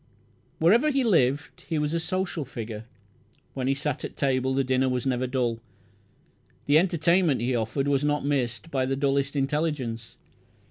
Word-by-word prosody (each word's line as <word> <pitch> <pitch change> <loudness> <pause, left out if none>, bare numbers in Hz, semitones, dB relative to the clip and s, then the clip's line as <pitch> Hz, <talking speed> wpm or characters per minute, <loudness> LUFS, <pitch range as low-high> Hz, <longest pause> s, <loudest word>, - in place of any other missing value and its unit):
Wherever 230 - +4
he 275 -2 +1
lived 145 - +1
he 160 - 0
was 150 +1 -1
a 170 - +1
social 180 -1 -2
figure. 115 -4 -7 0.7
When 130 -1 -2
he 135 - +2
sat 145 0 -3
at - - -7
table 130 -1 +1
the 135 - +2
dinner 130 0 +1
was 125 0 -2
never 130 -1 0
dull. 120 -3 -1 1.1
The 145 +2 +5
entertainment 170 -3 +2
he 125 +1 0
offered 120 +5 -1
was 140 0 +1
not 145 -1 0
missed 140 +1 -1
by 130 -2 0
the 135 - 0
dullest 140 +1 0
intelligence. 135 -5 -2
135 Hz, 160 wpm, -26 LUFS, 130-155 Hz, 1.1 s, The